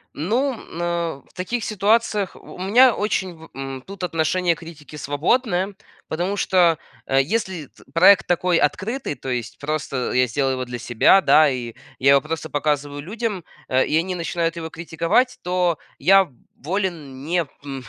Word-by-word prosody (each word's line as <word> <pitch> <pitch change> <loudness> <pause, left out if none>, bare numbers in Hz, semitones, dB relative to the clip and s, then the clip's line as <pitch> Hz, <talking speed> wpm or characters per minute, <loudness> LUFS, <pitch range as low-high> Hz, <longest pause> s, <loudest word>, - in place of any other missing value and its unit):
Ну, 235 - 0 0.2
на 170 -3 -2
в - - -27
таких 220 +6 -3
ситуациях 210 -1 +1
в - - -13
у - - -13
меня 225 +7 +5
очень 195 -4 -1
в, 160 0 -14
м, 135 -1 -6
тут 195 -1 -9
отношение 170 +1 +1
к - - -16
критике 155 -2 -11
свободное. 185 - 0 0.3
Потому 180 +5 -2
что, 175 -5 +3 0.3
э, 135 0 +3
если 190 0 -2
эт - - -22
проект 185 +4 +6
такой 175 0 +2
открытый, 210 - -1
то 135 - -8
есть 120 -2 -4
просто 145 -3 -2
я 125 0 +4
сделаю 135 +2 0
его 130 -1 -3
для 120 -1 -6
себя, 120 +11 +4
да. 155 -4 +6
И 120 -3 -5 0.2
я 135 +1 +5
его 140 - +6
просто 160 +1 -5
показываю 145 -1 -1
людям, 210 +2 -4 0.2
э, 130 0 +2
и 155 - -1
они 180 +2 -1
начинают 170 -1 -2
его 165 -1 -5
критиковать, 170 - 0
то 180 -2 +1 0.2
я 195 0 +5 0.3
волен 155 -5 -4
не, 170 +1 0 0.2
м, 135 -2 -6
170 Hz, 170 wpm, -22 LUFS, 145-190 Hz, 0.3 s, проект